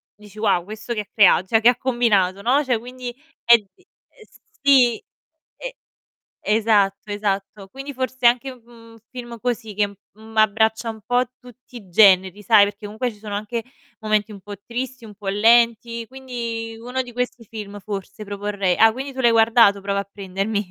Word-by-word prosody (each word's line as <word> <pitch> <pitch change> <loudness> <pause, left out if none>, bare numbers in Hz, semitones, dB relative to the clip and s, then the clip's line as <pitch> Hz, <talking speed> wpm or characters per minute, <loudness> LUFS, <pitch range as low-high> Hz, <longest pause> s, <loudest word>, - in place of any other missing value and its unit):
dici: 210 0 -15
"Wow 195 -5 +1
questo 220 +4 -6
che 210 - -2
ha 200 - -12
crea 200 -4 +5
cioè 220 +4 +2
che 235 - +6
ha 245 - +1
combinato", 210 -7 +1
no, 270 +6 +2
cioè 245 -4 0
quindi 250 0 -8 0.3
è 235 0 +8
d 210 - -16
uhm, 370 - -27 0.8
sì. 255 -5 +4 0.6
E - - -7 0.8
esatto, 205 -2 +1
esatto 200 -1 -3
quindi 275 +3 -8
forse 255 -1 -4
anche, 255 +2 +1
mhmm, 235 -2 -21 0.3
un - - -16
film 240 -2 -9
così 235 -3 -3
che, 205 0 +1
mhmm, 215 +2 -17
abbraccia 220 +1 +2
un 220 -1 -7
po' 245 0 +2 0.2
tutti 250 0 -15
i 200 -5 -13
generi, 190 0 +4
sai, 205 -1 +6
perché 205 0 -7
comunque 220 +4 -3
ci - - -19
sono 205 -1 -6
anche 220 +2 -4 0.4
momenti 215 -1 0
un 195 - -12
po' 205 +1 -8
tristi, 250 0 -5
un 210 - -11
po' 200 -1 -10
lenti, 230 +2 +3
quindi 235 -4 -6
uno 250 +3 -3
di 245 -2 -10
questi 245 -1 -4
film 205 -1 -8
forse 200 +1 -7
proporrei. 200 -2 -2
Ah, 225 0 +6
quindi 270 +3 -6
tu 260 - -4
l'hai 235 -1 +5
guardato 225 -3 +5
"Prova 200 0 -1
a 200 0 -6
prendermi". 200 +1 -3
220 Hz, 185 wpm, -21 LUFS, 205-245 Hz, 0.8 s, è